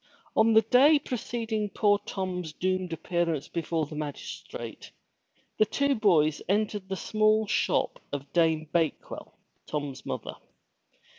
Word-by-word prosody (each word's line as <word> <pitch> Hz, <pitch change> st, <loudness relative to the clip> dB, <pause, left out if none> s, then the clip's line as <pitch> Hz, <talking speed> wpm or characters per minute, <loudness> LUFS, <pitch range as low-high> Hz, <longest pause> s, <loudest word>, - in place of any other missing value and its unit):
On 225 Hz, +1 st, +5 dB
the 220 Hz, 0 st, +6 dB
day 285 Hz, +5 st, +6 dB
preceding 225 Hz, -5 st, -3 dB
poor 205 Hz, 0 st, +3 dB
Tom's 180 Hz, -4 st, -3 dB
doomed 185 Hz, 0 st, -1 dB
appearance 165 Hz, -2 st, -1 dB
before 165 Hz, -1 st, -2 dB
the 150 Hz, -, -10 dB
magistrate, 150 Hz, -2 st, -7 dB, 0.7 s
the 215 Hz, -, +6 dB
two 280 Hz, +5 st, +1 dB
boys 165 Hz, -, +3 dB
entered 205 Hz, -1 st, 0 dB
the 190 Hz, -, -1 dB
small 215 Hz, +2 st, +2 dB
shop -, -, 0 dB
of 140 Hz, -1 st, -6 dB
Dame 160 Hz, -2 st, +2 dB
Bakewell, 165 Hz, -3 st, -2 dB, 0.3 s
Tom's 145 Hz, -3 st, -4 dB
mother. -, -, -5 dB
185 Hz, 125 wpm, -28 LUFS, 160-215 Hz, 0.7 s, the